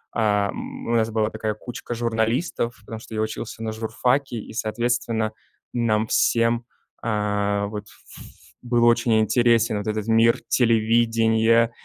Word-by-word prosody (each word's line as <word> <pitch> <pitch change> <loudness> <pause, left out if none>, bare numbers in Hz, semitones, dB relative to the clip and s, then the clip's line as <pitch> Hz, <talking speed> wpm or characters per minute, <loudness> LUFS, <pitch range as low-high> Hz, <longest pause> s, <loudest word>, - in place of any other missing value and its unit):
эм, 105 -3 -1
у - - -1
нас 110 -1 +2
была 110 -1 0
такая 110 -1 -3
кучка 120 +2 -7
журналистов, 115 +2 -1
потому 110 +1 -8
что 110 - -10
я 110 - 0
учился 110 +1 -5
на 110 - -2
журфаке, 125 +4 -1
и, 110 - -8
соответственно, 115 0 -1 0.4
нам 110 -3 +1
всем, 115 0 +2 0.4
э, 105 -2 0
вот, 105 -1 -6
ф - - -16 0.3
ф - - -10 0.4
был 120 -1 +2
очень 120 -1 +4
интересен 115 0 +3
вот 105 - -6
этот 110 0 -2
мир 115 +1 +4
телевидения, 115 0 +3
115 Hz, 140 wpm, -23 LUFS, 110-120 Hz, 0.4 s, очень